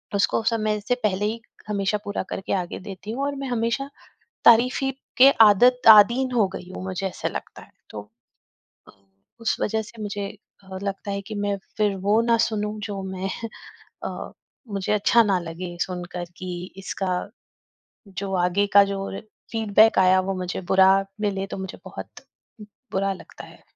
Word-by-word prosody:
उसको 200 Hz, +2 st, +2 dB
समय 215 Hz, -2 st, 0 dB
से 245 Hz, +4 st, 0 dB
पहले 205 Hz, -1 st, +1 dB
ही, 225 Hz, +2 st, -2 dB, 0.3 s
हमेशा 200 Hz, 0 st, 0 dB
पूरा 205 Hz, -, -3 dB
करके 195 Hz, -, -3 dB
आगे 180 Hz, -3 st, -2 dB
देती 195 Hz, +2 st, -8 dB
हूँ 270 Hz, +4 st, -3 dB
और 285 Hz, 0 st, -2 dB
मैं 275 Hz, 0 st, -5 dB
हमेशा 240 Hz, +3 st, -1 dB, 0.6 s
तारीफ 250 Hz, +3 st, +5 dB, 0.3 s
के 265 Hz, +2 st, +9 dB, 0.2 s
आदत 245 Hz, +5 st, +5 dB
आदीन 235 Hz, +5 st, +7 dB
हो 220 Hz, -5 st, +3 dB
गई 180 Hz, -, -9 dB
हूँ, -, -, -6 dB
मुझे 190 Hz, +1 st, -2 dB
ऐसा 185 Hz, -, -4 dB
लगता -, -, -7 dB
है। -, -, -21 dB, 0.2 s
तो 105 Hz, -, -7 dB, 0.9 s
अ, -, -, -15 dB, 0.5 s
उस 230 Hz, -, 0 dB
वजह 220 Hz, +1 st, 0 dB
से 220 Hz, +1 st, -11 dB
मुझे 205 Hz, -1 st, -4 dB, 0.4 s
अ, 190 Hz, -, -5 dB
लगता 200 Hz, 0 st, -4 dB
है 200 Hz, -, -2 dB
कि 215 Hz, +2 st, -8 dB
मैं 205 Hz, -1 st, -1 dB, 0.2 s
फिर 210 Hz, -2 st, +2 dB
वो 215 Hz, +2 st, +4 dB
ना 230 Hz, 0 st, +3 dB
सुनूँ, 215 Hz, -2 st, -1 dB
जो 200 Hz, -2 st, -5 dB
मैं 190 Hz, 0 st, -4 dB, 0.8 s
अ, -, -, -6 dB, 0.4 s
मुझे 195 Hz, +1 st, -1 dB
अच्छा 210 Hz, +3 st, +4 dB
ना 195 Hz, -3 st, +2 dB
लगे 175 Hz, +1 st, -7 dB
सुनकर 180 Hz, -1 st, -5 dB
कि 185 Hz, -, -6 dB, 0.3 s
इसका 190 Hz, -1 st, -3 dB, 1.0 s
जो 195 Hz, 0 st, -5 dB
आगे 200 Hz, +3 st, +1 dB
का 200 Hz, 0 st, +9 dB
जो 195 Hz, 0 st, -4 dB
रे 195 Hz, -, -6 dB, 0.3 s
फ़ीडबैक 220 Hz, -1 st, +4 dB
आया, 185 Hz, 0 st, +5 dB
वो 195 Hz, +1 st, -2 dB
मुझे 185 Hz, 0 st, -4 dB
बुरा 190 Hz, 0 st, +7 dB, 0.3 s
मिले, 195 Hz, -2 st, -1 dB
तो -, -, -6 dB
मुझे 190 Hz, 0 st, -6 dB
बहुत -, -, -9 dB, 0.7 s
बुरा 195 Hz, +1 st, +1 dB
लगता 185 Hz, -, -12 dB
है। -, -, -17 dB
200 Hz, 170 wpm, -24 LUFS, 190-220 Hz, 1.0 s, के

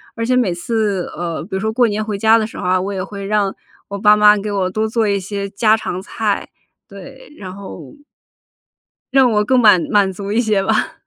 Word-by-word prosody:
而 230 Hz, -, -4 dB
且 250 Hz, +2 st, +1 dB
每 230 Hz, -8 st, +1 dB
次 205 Hz, 0 st, -2 dB
呃 170 Hz, -2 st, -4 dB
比 180 Hz, -, -14 dB
如 190 Hz, -, -1 dB
说 220 Hz, +2 st, -2 dB
过 240 Hz, 0 st, +3 dB
年 215 Hz, 0 st, -2 dB
回 210 Hz, -2 st, -3 dB
家 220 Hz, +2 st, +5 dB
的 220 Hz, -, 0 dB
时 220 Hz, -, -10 dB
候 -, -, -6 dB
啊， 185 Hz, +1 st, +2 dB
我 195 Hz, +2 st, -4 dB
也 190 Hz, -1 st, -3 dB
会 200 Hz, 0 st, -8 dB
让 200 Hz, -1 st, 0 dB, 0.4 s
我 200 Hz, -, -5 dB
爸 210 Hz, +1 st, +5 dB
妈 210 Hz, 0 st, +5 dB
给 210 Hz, +1 st, -4 dB
我 190 Hz, -2 st, -1 dB
多 215 Hz, +4 st, -1 dB
做 225 Hz, 0 st, 0 dB
一 200 Hz, -1 st, 0 dB
些 200 Hz, +1 st, -5 dB
家 215 Hz, +2 st, +2 dB
常 185 Hz, -4 st, -4 dB
菜， 210 Hz, +1 st, -3 dB, 0.4 s
对， -, -, -13 dB
然 185 Hz, -2 st, -9 dB
后 200 Hz, +8 st, -10 dB, 1.2 s
让 265 Hz, -3 st, +4 dB
我 210 Hz, -1 st, +2 dB
更 255 Hz, +2 st, +3 dB
满 210 Hz, -6 st, +6 dB
满 200 Hz, -2 st, +3 dB
足 200 Hz, +2 st, -6 dB
一 225 Hz, +3 st, +2 dB
些 215 Hz, -4 st, 0 dB
吧。 -, -, 0 dB
210 Hz, 240 characters per minute, -17 LUFS, 195-220 Hz, 1.2 s, 满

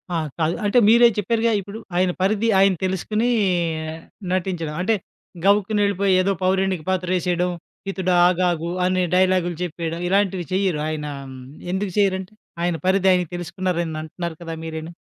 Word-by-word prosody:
ఆ! -, -, +2 dB, 0.2 s
కాదు. 160 Hz, +1 st, +1 dB
అంటే 205 Hz, +4 st, +2 dB
మీరే 235 Hz, +1 st, +7 dB
చెప్పారుగా 230 Hz, +3 st, +1 dB
ఇప్పుడు 200 Hz, +3 st, -9 dB, 0.2 s
ఆయన 180 Hz, 0 st, +2 dB
పరిధి 215 Hz, +4 st, +2 dB
ఆయన 195 Hz, -1 st, +5 dB
తెలుసుకొనీ 210 Hz, +5 st, 0 dB, 1.0 s
నటించడం. 175 Hz, -4 st, -2 dB
అంటే 220 Hz, +4 st, +2 dB, 0.5 s
గవుక్కునెళ్ళిపోయి 200 Hz, -1 st, +2 dB
ఏదో 195 Hz, +2 st, +1 dB
పౌరానిక 190 Hz, -1 st, +1 dB
పాత్రేసేయడం, 180 Hz, -1 st, 0 dB, 0.4 s
"హితుడా 185 Hz, -2 st, 0 dB
ఆగాగు" 175 Hz, -2 st, 0 dB, 0.2 s
అనే 185 Hz, 0 st, +1 dB
డైలాగులు 185 Hz, -2 st, +2 dB
చెప్పేయడం. 165 Hz, -1 st, -4 dB
ఇలాంటివి 195 Hz, -2 st, +1 dB
చెయ్యరు. 185 Hz, -5 st, +1 dB
ఆయన 155 Hz, -1 st, -4 dB, 0.7 s
ఎందుకు 190 Hz, 0 st, -2 dB
చేయ్యరంటే 190 Hz, -1 st, +1 dB, 0.3 s
ఆయన 175 Hz, -1 st, +1 dB
పరిది 190 Hz, 0 st, +3 dB
ఆయన 180 Hz, -1 st, +1 dB
తెలుసుకున్నారని 175 Hz, -2 st, -2 dB
అంటున్నారు 170 Hz, +1 st, -5 dB
కదా 165 Hz, -1 st, -5 dB
మీరేను? 160 Hz, 0 st, -6 dB
185 Hz, 130 wpm, -22 LUFS, 175-195 Hz, 1.0 s, మీరే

